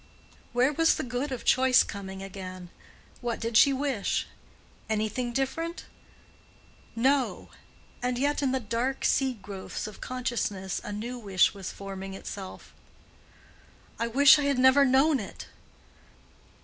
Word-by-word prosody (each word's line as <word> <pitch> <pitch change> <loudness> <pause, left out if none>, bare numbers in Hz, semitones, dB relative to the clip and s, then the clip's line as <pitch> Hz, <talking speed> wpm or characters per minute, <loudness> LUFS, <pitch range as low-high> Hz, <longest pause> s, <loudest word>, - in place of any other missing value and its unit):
Where 250 +4 +2
was 325 +2 +3
the - - -3
good 250 +3 -3
of 255 - -5
choice 260 -1 +5
coming 195 -2 -7
again? 185 -2 -8 0.5
What 240 -2 -2
did 230 0 -3
she 275 +5 +7
wish? 270 -6 -1 0.6
Anything 220 +3 -1
different? 325 +7 -3 1.1
No! 265 +3 +1 0.5
And 250 0 -1
yet 285 +3 0
in 270 -2 +1
the 265 - 0
dark 235 +4 -2
seed 255 -7 +1
growths 195 -1 -6
of 215 -1 -9
consciousness 225 -7 -3
a - - -6
new 235 +4 -5
wish 195 -5 +2
was 195 -3 -6
forming 195 -1 -7
itself—"I 195 +3 -11
wish 280 +5 +7
I 290 - 0
had 280 -2 +1
never 260 +2 +6
known 270 +2 +4
it!" 200 - -8
245 Hz, 130 wpm, -28 LUFS, 200-265 Hz, 1.1 s, she